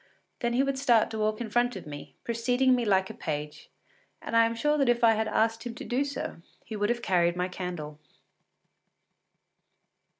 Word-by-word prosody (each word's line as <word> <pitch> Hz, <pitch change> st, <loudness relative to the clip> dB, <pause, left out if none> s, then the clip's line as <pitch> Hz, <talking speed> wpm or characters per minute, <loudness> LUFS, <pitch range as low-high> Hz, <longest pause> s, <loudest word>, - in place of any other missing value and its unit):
Then 235 Hz, -1 st, 0 dB
he 255 Hz, +3 st, +3 dB
would 275 Hz, -1 st, -1 dB
start 240 Hz, -6 st, +3 dB
to 220 Hz, -, -4 dB
walk 215 Hz, +1 st, 0 dB
in 220 Hz, -3 st, -5 dB
front 240 Hz, +1 st, +2 dB
of 190 Hz, -, -7 dB
me, 145 Hz, -1 st, -9 dB
preceding 245 Hz, +3 st, +2 dB
me 245 Hz, -2 st, +1 dB
like 190 Hz, -2 st, +2 dB
a -, -, -10 dB
page, 150 Hz, -1 st, -5 dB, 0.5 s
and -, -, -5 dB
I 230 Hz, 0 st, +6 dB
am 230 Hz, -, -3 dB
sure 295 Hz, +6 st, +1 dB
that 275 Hz, -3 st, +3 dB
if 240 Hz, 0 st, +2 dB
I 230 Hz, -, +7 dB
had 220 Hz, 0 st, 0 dB
asked 225 Hz, +1 st, +1 dB
him 240 Hz, -1 st, -6 dB
to -, -, -7 dB
do 255 Hz, +3 st, 0 dB
so, 280 Hz, -1 st, -5 dB, 0.3 s
he 220 Hz, -, -6 dB
would 205 Hz, 0 st, 0 dB
have 240 Hz, 0 st, -1 dB
carried 175 Hz, -2 st, +2 dB
my 180 Hz, 0 st, -1 dB
candle. 175 Hz, -5 st, -6 dB
230 Hz, 200 wpm, -28 LUFS, 190-245 Hz, 0.5 s, I